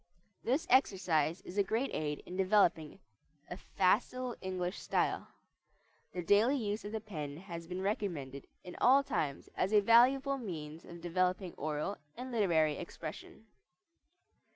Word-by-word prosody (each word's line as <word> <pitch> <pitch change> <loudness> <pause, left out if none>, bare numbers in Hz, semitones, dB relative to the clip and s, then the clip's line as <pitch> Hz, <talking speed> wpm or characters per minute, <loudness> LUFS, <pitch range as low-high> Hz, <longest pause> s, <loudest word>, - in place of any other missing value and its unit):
This 275 +8 +1
exercise 185 - +2
is 190 +3 -5
a - - +5
great 225 +7 -1
aid 150 -1 -3
in 180 - -8
developing 185 -5 +2 0.5
a - - -3
facile 240 +7 0
English 185 -1 -3
style. - - 0 0.8
The 180 - -4
daily 215 +10 +4
use 210 -3 -2
of 205 - -6
the 220 - -2
pen 155 -9 -6
has 170 -2 -8
been 180 +2 -4
recommended 160 -10 -3 0.2
in 180 - -9
all 270 +3 +6
times 140 - -2
as 190 - 0
a 210 - +6
valuable 265 +6 +4
means 160 -7 -7
of 170 0 -10
developing 180 +1 0
oral 155 +6 -3 0.2
and 255 +1 -6
literary 165 -9 +2
expression. 170 +4 -8
185 Hz, 140 wpm, -33 LUFS, 165-220 Hz, 0.8 s, all